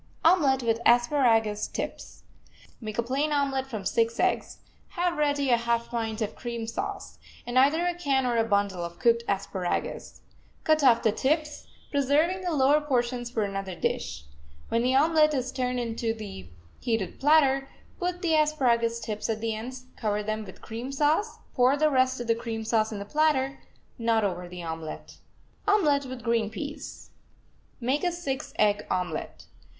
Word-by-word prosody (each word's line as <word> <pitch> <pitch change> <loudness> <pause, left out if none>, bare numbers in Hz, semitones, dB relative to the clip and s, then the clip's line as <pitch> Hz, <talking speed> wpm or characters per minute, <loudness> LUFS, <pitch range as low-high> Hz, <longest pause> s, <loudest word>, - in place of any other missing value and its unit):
OMELET 285 -7 +4
WITH 230 -1 +1
ASPARAGUS 235 -4 +3
TIPS - - -6 0.6
Make 215 -2 -6
a 235 - +1
plain 275 +5 0
omelet 275 -2 0
from 215 -7 -6
six 230 +3 +1
eggs, - - 0 0.4
have 350 0 +1
ready 285 -3 +1
a 240 - +5
half 235 0 -1
pint 225 -1 -2
of 210 - -5
cream 235 -2 -5
sauce, 390 - -5 0.3
and 245 +1 +2
either 305 +6 +4
a 355 - +1
can 275 -6 0
or 245 -1 +1
a 225 - +3
bundle 200 -4 0
of 170 0 -7
cooked 235 -1 +3
asparagus. 195 -2 -3 0.4
Cut 310 -1 +3
off 240 -4 +5
the 220 - +4
tips, 300 +6 -1 0.2
preserving 295 +6 +2
the 360 -1 -2
lower 290 0 +4
portions 245 -4 -1
for 225 -3 -1
another 195 -2 -4
dish. 75 - -2 0.5
When 230 - +1
the 255 +2 +2
omelet 305 +1 +4
is 255 -1 -2
turned 250 -1 -1
onto 230 -1 -2
the 200 - -8 0.3
heated 225 -5 -2
platter, 275 -2 +4 0.3
put 360 -1 -2
the 330 -2 +2
asparagus 240 -7 +2
tips 215 -1 -4
at 220 -1 -1
the 225 0 -1
ends, 255 +4 -7
cover 210 -2 -1
them 215 +1 -3
with 190 - -13
cream 235 +4 -6
sauce, 305 +10 +1 0.2
pour 255 +2 +4
the 305 +1 +3
rest 260 -1 +2
of 240 - -4
the 230 - +3
cream 225 -1 -5
sauce 220 -1 +1
in 215 - -4
the 200 - -5
platter, 275 0 +1 0.4
not 230 -1 +2
over 180 -3 -2
the 180 -1 -8
omelet. 160 -1 -7 0.5
OMELET 300 -10 +3
WITH 255 -2 -7
GREEN 230 -3 +1
PEAS 290 +6 -7 0.7
Make 265 +6 0
a 355 - +2
six 310 -7 -4
egg 210 -1 +2
omelet. 180 -4 -3
245 Hz, 170 wpm, -27 LUFS, 220-285 Hz, 0.7 s, a